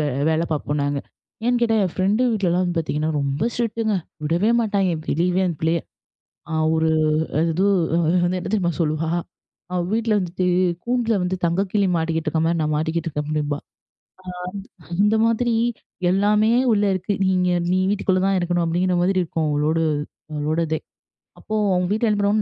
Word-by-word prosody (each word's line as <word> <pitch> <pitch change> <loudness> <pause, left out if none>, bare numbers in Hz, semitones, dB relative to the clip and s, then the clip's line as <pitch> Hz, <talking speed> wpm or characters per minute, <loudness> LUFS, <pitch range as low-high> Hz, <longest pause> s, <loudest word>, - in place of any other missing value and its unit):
வே 150 - +1 0.2
வேல 160 +1 +1
பார்ப்போம் 145 -1 -2
நாங்க. 145 0 -1 0.5
ஏன்னு 245 0 +2
கேட்டா 225 -2 +2
என் 180 - -2
ஃப்ரெண்டு 200 +5 +1
வீட்லலாம் 185 -4 +1
வந்து 175 -1 -2
பார்த்தீங்கன்னா 155 0 -1
ரொம்ப 140 +9 -1
ஸ்ட்ரிக்ட்டுங்க. 225 -2 -1 0.3
விடவே 175 +8 +2
மாட்டாய்ங்க, 200 -5 +1
வெளியவே 180 +4 +1
அந்த 170 -3 -2
பிள்ளைய. 165 +1 +2 0.7
அ 160 - -2 0.2
ஒரு 160 0 +2 0.5
எது 170 +3 +1 0.4
அது 170 - +2
என்ன 180 +1 -1
தெரியுமா 180 -5 +1
சொல்லுவா 155 0 0 0.7
அவ 180 - +1
வீட்டுல 225 -1 +1
வந்துட்டு 180 0 -2 0.4
"கூண்டில்ல 240 -2 +1
வந்து 180 +1 -1
தங்க 170 +3 +2
கிளி 200 -2 +2
மாட்டிக்கிட்டு 160 0 -1
இருக்கிற 160 0 0
மாரி, 170 0 +1
நான் 155 0 0
மாட்டிக்கிட்டு 160 +2 -1
இருக்கேன்." 150 -1 -4
அப்டிம்பா. 150 -1 -1 1.2
ஆ - - -18 0.2
அந்த 210 +1 +3
மாதிரி, 230 +1 +1 0.6
"எல்லாமே 210 +3 +3 0.2
உள்ள 205 -1 +2
இருக்கு. 190 +2 -2
நீங்க 180 -1 +2 0.2
நீ 185 - +2
வீட்டுக்குள்ள 190 -2 +1
தான் 195 -1 +2
இருக்கணும்." 175 0 0
அப்டிங்கிற 180 +2 +1
மாதிரி 185 0 +2
இருக்கும். 160 -1 -2
அவளோடு 155 +3 +1 0.5
அவளோட 150 +2 -1
இதே. 160 - 0 0.6
அப்போ, 215 - -5 0.2
அவங்க 180 0 0
வீட்டுல 220 +2 +1
என்ன 210 - +1
பண்ணுவாங்க, 205 +2 +2
180 Hz, 165 wpm, -22 LUFS, 160-205 Hz, 1.2 s, அந்த